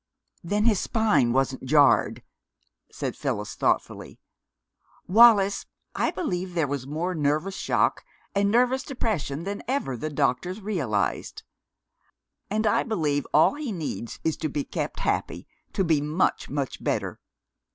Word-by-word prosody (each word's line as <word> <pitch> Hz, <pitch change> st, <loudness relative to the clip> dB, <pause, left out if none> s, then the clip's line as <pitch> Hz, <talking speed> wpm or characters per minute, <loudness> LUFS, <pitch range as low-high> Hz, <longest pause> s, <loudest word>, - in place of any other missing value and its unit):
"Then 205 Hz, +5 st, 0 dB
his 215 Hz, -5 st, +4 dB
spine 210 Hz, -, +2 dB
wasn't 135 Hz, +1 st, 0 dB
jarred," 140 Hz, 0 st, +4 dB, 0.7 s
said -, -, -4 dB
Phyllis -, -, -3 dB
thoughtfully. -, -, -1 dB, 0.9 s
"Wallis, 205 Hz, -1 st, +5 dB, 0.3 s
I -, -, 0 dB
believe 180 Hz, -, -3 dB
there 165 Hz, -3 st, +2 dB
was 140 Hz, -2 st, -4 dB
more 165 Hz, +5 st, -2 dB
nervous 155 Hz, +4 st, 0 dB
shock -, -, +1 dB, 0.3 s
and 200 Hz, 0 st, +2 dB
nervous 250 Hz, +4 st, +3 dB
depression 195 Hz, -, -3 dB
than 200 Hz, +2 st, -4 dB
ever 255 Hz, -, -1 dB
the 155 Hz, +6 st, -4 dB
doctors 155 Hz, -, -1 dB
realized. 160 Hz, -, -2 dB, 1.1 s
And 215 Hz, +2 st, 0 dB
I 210 Hz, -, +3 dB
believe 150 Hz, -, -1 dB
all 155 Hz, -, +5 dB
he 290 Hz, -4 st, -4 dB
needs 155 Hz, -, -5 dB
is 160 Hz, -, 0 dB
to 155 Hz, -, -2 dB
be 145 Hz, 0 st, -2 dB
kept -, -, -4 dB
happy, -, -, -2 dB, 0.3 s
to 195 Hz, -, +1 dB
be 160 Hz, -4 st, +2 dB
much, 155 Hz, +5 st, 0 dB
much 140 Hz, -2 st, -4 dB
better. -, -, -2 dB
175 Hz, 135 wpm, -26 LUFS, 145-210 Hz, 1.1 s, Wallis